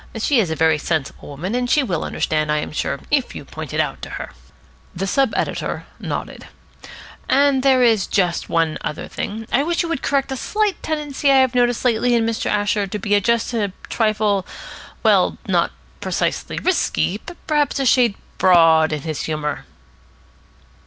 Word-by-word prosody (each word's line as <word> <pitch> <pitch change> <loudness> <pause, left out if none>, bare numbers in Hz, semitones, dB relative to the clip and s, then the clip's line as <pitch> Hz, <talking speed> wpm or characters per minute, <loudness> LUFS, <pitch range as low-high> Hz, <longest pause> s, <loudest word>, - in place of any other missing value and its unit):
She 245 +4 +2
is 195 -7 +1
a 160 - -1
very 160 -1 +3
sensible 155 -3 -3
woman, 165 +9 -5
and 245 0 -1
she 295 - +3
will 180 -10 -2
understand, 155 -1 -1
I 150 - +2
am 150 - -3
sure, 140 -2 -2
if 280 -4 +1
you - - -7
point - - -8
it - - -2
out - - -1
to - - -7
her." - - -6 0.6
The 185 +3 -2
sub 265 +4 +2
editor - - -2
nodded. - - -5 0.8
"And 275 0 +4
there 260 -1 +4
is 225 -5 +3
just 180 -4 0
one 165 -2 +1
other 150 - -5
thing. 220 +2 -5
I 270 - +3
wish 340 +3 0
you 340 - -4
would 330 -5 -2
correct 275 -1 0
a - - -1
slight 420 - -1
tendency 295 -2 -1
I 270 - +6
have 260 -1 +3
noticed 245 0 +1
lately 240 0 +3
in 230 -1 +2
Mr. 225 -1 -2
Asher 205 -1 +1
to 200 - -4
be 205 0 +1
just 235 +3 +1
a 205 -5 -1 0.2
trifle 215 -3 +1 0.6
well, - - +3
not - - +2 0.3
precisely - - -2
risky, 225 - 0
but 345 - -10
perhaps 295 -2 +1
a 270 - 0
shade 245 -4 +4 0.2
broad 165 -3 +5
in 150 -2 -3
his 155 -3 -3
humour." 150 -1 -3
220 Hz, 180 wpm, -20 LUFS, 175-265 Hz, 0.8 s, I